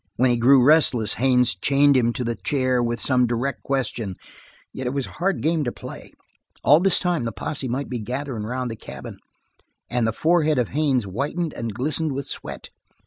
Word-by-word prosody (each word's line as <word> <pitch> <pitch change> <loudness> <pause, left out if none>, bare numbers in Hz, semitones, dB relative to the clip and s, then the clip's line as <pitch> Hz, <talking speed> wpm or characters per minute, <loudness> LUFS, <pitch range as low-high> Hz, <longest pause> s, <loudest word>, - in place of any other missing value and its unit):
When 125 +1 +3
he - - +3
grew 125 +2 +5
restless, 130 -8 +4
Haines 125 -4 +3
chained 140 +7 +3
him 120 -2 +3
to 125 - -3
the 120 0 -1
chair 130 +4 0
with 120 -1 -1
some 125 -1 +2
direct 120 +4 -2
question, 120 -7 -2 0.6
yet 130 -1 -4
it 125 - -3
was 140 -2 -1
a - - -11
hard 195 +2 -1
game 160 0 +1
to 120 - -2
play. - - -10 0.5
All 150 +2 +6
this 190 0 +3
time 175 -7 0
the 115 - -2
posse 130 +7 -4
might 130 +4 -3
be 125 -2 -4
gathering 125 0 -4
around 125 +3 -3
the 115 - -5
cabin; - - -9 0.7
and 120 -2 +1
the - - +1
forehead 155 +3 +2
of 125 -3 0
Haines 140 -4 +1
whitened 145 - -3
and 115 -3 -5
glistened 150 +4 -1
with 140 0 -3
sweat. - - -5
130 Hz, 195 wpm, -23 LUFS, 120-145 Hz, 0.7 s, All